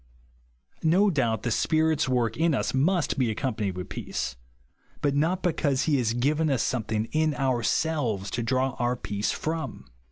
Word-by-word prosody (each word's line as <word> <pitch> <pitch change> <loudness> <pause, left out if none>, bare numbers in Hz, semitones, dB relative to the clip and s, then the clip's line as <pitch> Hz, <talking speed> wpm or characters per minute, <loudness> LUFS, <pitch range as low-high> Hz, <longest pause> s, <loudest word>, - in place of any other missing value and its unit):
No 190 +6 +4
doubt 115 - 0
the 120 - -1
Spirit's 155 +2 +2
work 120 -3 +1
in 160 -1 +2
us - - -1
must 155 +3 +1
be 125 -3 +2
accompanied 105 -4 -2
with 90 - -6
peace; 65 +1 -4 0.6
but 145 -1 +1
not 165 +6 +1
because 145 -6 +1
he 150 -3 +2
has 115 -2 0
iiiven 150 +5 +1
us 135 - +1
somethiuG; 110 -2 -1
in 155 -1 +1
ourselves 125 -4 0
to 120 - -2
draw 130 +3 +1
our 120 0 +1
peace 105 -3 -2
from. 160 +1 -4
130 Hz, 160 wpm, -26 LUFS, 115-155 Hz, 0.6 s, No